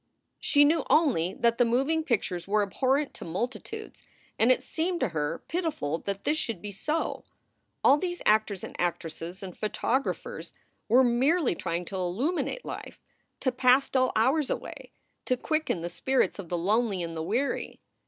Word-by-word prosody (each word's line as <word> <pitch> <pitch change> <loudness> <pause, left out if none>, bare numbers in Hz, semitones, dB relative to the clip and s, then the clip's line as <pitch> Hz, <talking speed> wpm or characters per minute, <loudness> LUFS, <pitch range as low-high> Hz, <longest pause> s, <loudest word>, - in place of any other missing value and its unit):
She 290 -1 +5
knew 320 +3 +3
only 215 - +3
that 235 0 +1
the - - +7
moving 270 +7 +1
pictures 195 - -1
were 210 +1 +3
abhorrent 265 +8 0
to - - -7
multitudes 245 - -5 0.3
and 235 +3 +5
it 255 - +2
seemed 345 +2 -1
to 260 - +2
her 155 -1 -2
pitiful 300 - -2
that 200 0 -4
this 310 +1 +1
should 225 -6 -2
be 205 +3 -6
so. 300 - -2 0.6
All 280 +2 +6
these 350 0 -3
actors 210 -2 +2
and - - -7
actresses 175 +1 -3
and 185 -2 -7
photographers 245 +5 -2 0.4
were 250 +4 +6
merely 265 - +3
trying 170 +1 -3
to 190 - -5
illuminate 250 - -1
life, - - -7 0.4
to 260 - +2
pass 255 +2 +4
dull 255 -1 +3
hours 265 +6 +2
away, - - -5 0.4
to 255 - +1
quicken 310 - -1
the 170 - -3
spirits 260 +6 0
of 180 -4 -7
the 175 - -1
lonely 200 +1 +1
and 165 -1 -5
the 160 - -3
weary. 230 - -2
235 Hz, 165 wpm, -28 LUFS, 185-285 Hz, 0.6 s, the